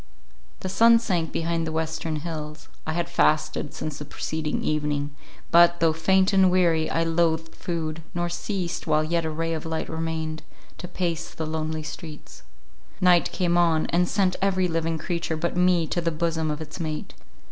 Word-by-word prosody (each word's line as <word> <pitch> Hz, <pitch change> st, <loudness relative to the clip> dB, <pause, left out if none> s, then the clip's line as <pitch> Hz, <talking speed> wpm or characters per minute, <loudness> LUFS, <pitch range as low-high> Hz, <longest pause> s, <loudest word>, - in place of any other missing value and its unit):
The -, -, -3 dB
sun 230 Hz, +5 st, +6 dB
sank 180 Hz, -8 st, -1 dB
behind 165 Hz, 0 st, -1 dB
the -, -, -2 dB
western 160 Hz, 0 st, -2 dB
hills; 155 Hz, -2 st, -6 dB, 0.2 s
I 160 Hz, -, -1 dB
had 170 Hz, +1 st, -1 dB
fasted 155 Hz, -3 st, +1 dB
since 155 Hz, -2 st, -5 dB
the 150 Hz, -, -6 dB
preceding 155 Hz, +1 st, -3 dB
evening, 145 Hz, -1 st, -1 dB, 0.4 s
but, 170 Hz, 0 st, +6 dB
though 165 Hz, -1 st, +3 dB
faint 190 Hz, +5 st, +3 dB
and 190 Hz, -1 st, +6 dB
weary, 170 Hz, -3 st, +2 dB
I 165 Hz, -, +1 dB
loathed 165 Hz, -1 st, +1 dB
food, 165 Hz, -2 st, -4 dB
nor 175 Hz, 0 st, 0 dB
ceased, 175 Hz, 0 st, -3 dB
while 155 Hz, 0 st, +3 dB
yet 165 Hz, +1 st, 0 dB
a -, -, -1 dB
ray 165 Hz, +1 st, -2 dB
of 160 Hz, -, -4 dB
light 160 Hz, 0 st, -3 dB
remained, 160 Hz, -1 st, -3 dB, 0.4 s
to 180 Hz, -, -6 dB
pace 170 Hz, -2 st, -3 dB
the 160 Hz, -, -4 dB
lonely 155 Hz, 0 st, -3 dB
streets. 155 Hz, -1 st, -9 dB, 0.6 s
Night 180 Hz, -2 st, +4 dB
came 175 Hz, -2 st, +1 dB
on, 165 Hz, -2 st, +3 dB
and 175 Hz, +1 st, +2 dB
sent 190 Hz, -3 st, +2 dB
every 185 Hz, -2 st, +2 dB
living 165 Hz, -1 st, -1 dB
creature 170 Hz, -1 st, -2 dB
but 170 Hz, +3 st, -2 dB
me 180 Hz, -2 st, +3 dB
to 175 Hz, -, 0 dB
the 165 Hz, -, +1 dB
bosom 160 Hz, -1 st, -1 dB
of 150 Hz, +1 st, -3 dB
its 160 Hz, +3 st, -8 dB
mate. 155 Hz, -2 st, -4 dB
165 Hz, 180 wpm, -25 LUFS, 155-175 Hz, 0.6 s, sun